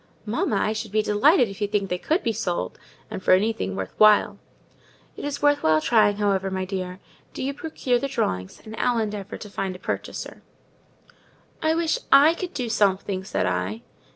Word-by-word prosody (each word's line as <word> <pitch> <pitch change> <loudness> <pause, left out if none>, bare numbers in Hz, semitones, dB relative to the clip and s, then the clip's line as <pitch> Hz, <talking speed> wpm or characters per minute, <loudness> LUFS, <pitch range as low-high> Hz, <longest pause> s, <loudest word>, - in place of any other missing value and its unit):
"Mamma, 220 0 -1
I 215 +2 +1
should 220 -1 -5
be 215 0 +2
delighted 245 - +4
if 195 +1 -10
you 205 - +1
think 205 -1 -1
they 180 - -1
could 325 - 0
be 230 - 0
sold; 175 - -3 0.3
and - - -5
for 185 - +4
anything 210 0 -1
worth - - -5
while." 215 -1 +5 0.8
"It's 285 0 -5
worth 290 0 +4
while 155 0 +4
trying, 210 +2 +3
however, 195 -2 +1
my 190 0 -2
dear: 185 -1 -5 0.4
do - - -4
you 275 +1 -1
procure 280 -5 -1
the 275 - -2
drawings, 95 - -2
and 220 0 -8
I'll 245 -1 +1
endeavour 210 -3 -3
to 210 - -9
find 195 -2 -4
a - - -7
purchaser." - - -5 1.2
"I 315 0 +2
wish 335 +7 0
I 285 +4 +7
could 360 +1 -6
do 250 -3 -2
something," 195 -3 +1
said 140 - -1
I. 95 +5 -2
210 Hz, 185 wpm, -24 LUFS, 190-250 Hz, 1.2 s, I